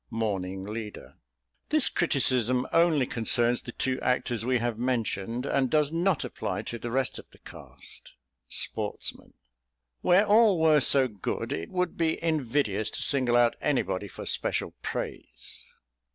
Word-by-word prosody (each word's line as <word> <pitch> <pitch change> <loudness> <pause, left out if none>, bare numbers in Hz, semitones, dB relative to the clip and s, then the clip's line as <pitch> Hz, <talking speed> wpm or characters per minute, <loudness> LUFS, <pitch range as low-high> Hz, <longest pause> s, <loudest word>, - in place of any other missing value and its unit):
Morning 95 -5 -3
Leader. 105 +1 -7 0.6
"This 305 -1 +4
criticism 130 -6 +1
only 165 -5 +4
concerns 120 +1 +2
the 120 - -8
two 130 +1 -2
actors 120 -2 0
we 125 +1 +1
have 120 -1 -2
mentioned, 120 -1 -2
and 135 -2 +1
does 150 0 +2
not 170 0 +1
apply - - -4
to 120 - -6
the 120 - -5
rest 130 +2 -1
of - - -14
the - - -20
cast." - - -9 0.3
Sportsman. - - -3 0.7
"Where 190 +4 +4
all 210 -3 +5
were 155 -2 +5
so 135 0 +4
good 105 -6 -4
it 80 - -5
would 180 -1 -2
be 160 -1 +1
invidious 130 -9 0
to - - -2
single 130 -4 +5
out 120 -1 +3
anybody 100 -9 -1
for - - -9
special - - -1
praise." - - -6
125 Hz, 145 wpm, -27 LUFS, 115-155 Hz, 0.7 s, all